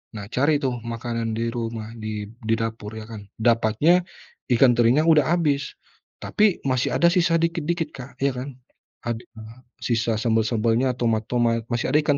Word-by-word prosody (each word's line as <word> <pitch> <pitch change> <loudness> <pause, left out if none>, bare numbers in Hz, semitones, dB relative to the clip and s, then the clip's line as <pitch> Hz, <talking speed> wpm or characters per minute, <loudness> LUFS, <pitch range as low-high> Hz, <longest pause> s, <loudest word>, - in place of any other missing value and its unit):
nah 100 -2 -6
cari 145 +5 +2
tuh 130 -3 -1
makanan 115 -1 -3
di 115 0 -1
rumah, 115 -2 -4
di 110 -1 -5 0.2
di 110 +1 +1
dapur 110 -1 -4
ya 110 - -8
kan, 105 -3 -8 0.2
dapatnya, 120 +10 +3 0.5
ikan 125 +1 +6
terinya 120 +5 +4
udah 155 -4 +5
habis. 145 -5 0 0.5
Tapi, 210 -3 +2
masih 130 -1 +1
ada 170 - +4
sisa 175 -1 +2
dikit-dikit, 165 -1 -1
Kak, 125 0 -11
ya 140 0 +2
kan. 135 +2 -5 0.5
Ad 120 -1 -1
heeh, 110 +1 -13 0.2
sisa 115 -1 0
sambel-sambelnya, 115 +2 +1
tomat-tomat, 115 0 +1
masih 120 +1 0
ada 145 - +4
ikan 145 -2 +2
120 Hz, 160 wpm, -23 LUFS, 115-140 Hz, 0.5 s, ikan